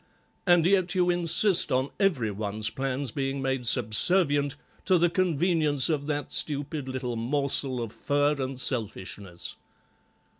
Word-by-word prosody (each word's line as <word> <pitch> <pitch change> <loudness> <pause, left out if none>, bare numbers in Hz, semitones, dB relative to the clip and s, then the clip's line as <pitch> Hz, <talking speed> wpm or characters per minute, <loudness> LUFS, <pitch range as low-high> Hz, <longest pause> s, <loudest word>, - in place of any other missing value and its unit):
And 175 -2 +4
yet 185 -1 +1
you 180 -1 +2
insist 175 +2 +3
on 130 +2 0
every 150 - +1
one's 105 +2 -3
plans 135 -1 -4
being 135 +1 -3
made 130 -2 -2
subservient 145 - +2 0.3
to 185 -2 +3
the 170 0 +2
convenience 165 -5 +2
of 150 -3 -2
that 145 -2 -4
stupid 145 -1 +1
little 130 -2 -4
morsel 130 +1 -1
of 115 -3 -5
fur 145 +1 0
and 130 0 -4
selfishness." 100 -7 -4
140 Hz, 135 wpm, -26 LUFS, 125-165 Hz, 0.3 s, And